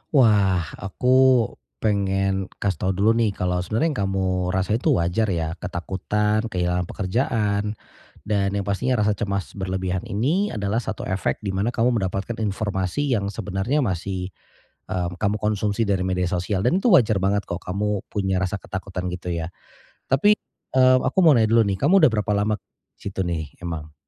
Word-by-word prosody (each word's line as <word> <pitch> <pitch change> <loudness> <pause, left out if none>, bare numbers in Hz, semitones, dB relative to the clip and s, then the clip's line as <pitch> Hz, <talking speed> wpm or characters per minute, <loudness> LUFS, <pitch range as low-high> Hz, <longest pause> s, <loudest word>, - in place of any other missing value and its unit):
Wah, 100 -8 +4 0.2
aku 100 +5 -4 0.8
pengen 95 -2 +1 0.2
kasih 95 -6 0
tahu 95 - 0
dulu 105 +4 +3
nih, 105 -3 +1
kalau 90 -1 -1
sebenarnya 110 - 0
yang 125 - -3
kamu 95 0 -1 0.3
rasa 95 +5 +1
itu 145 -1 +2
wajar 90 +6 +1
ya, 80 -4 -1
ketakutan, 105 +4 -1
kehilangan 90 -2 -1
pekerjaan. 105 0 -1 0.5
Dan 100 -1 0
yang 100 - -1
pastinya 100 +6 0
rasa 105 - +3
cemas 100 -2 -2
berlebihan 95 -1 -2
ini 155 - +1
adalah 105 +2 0
1 110 -3 -5
efek 95 +3 -2
di 100 - -2
mana 100 +6 -1
kamu 120 0 +2
mendapatkan 95 +4 -3
informasi 105 +5 -1
yang 100 - -3
sebenarnya 100 +8 -1
masih, 95 -1 -3 0.6
mmm, 90 -1 -3
kamu 105 0 +1
konsumsi 105 +1 0
dari 95 -2 +1
media 90 -1 0
sosial 90 +2 -1
dan 175 +10 +3
itu 245 - 0
wajar 110 - +5
banget 100 +2 +1
kok, 85 - -4
kamu 100 +2 -1
punya 95 -2 0
rasa 95 +2 -1
ketakutan 90 -1 -5
gitu 90 0 -7
ya. 80 0 -3 0.6
Tapi, 205 +11 +5 0.4
eee, 130 0 +6
aku 135 - -2
mau 155 -4 +7
nanya 110 -1 +3
dulu 115 - +6
nih, 95 -1 -1
kamu 175 +6 +4
udah - - +3
berapa 105 0 0
lama 105 +1 +1 0.4
di - - -34
situ 95 -1 -3
nih 80 -4 -4
emang? 80 -3 -6
100 Hz, 170 wpm, -23 LUFS, 95-110 Hz, 0.8 s, mau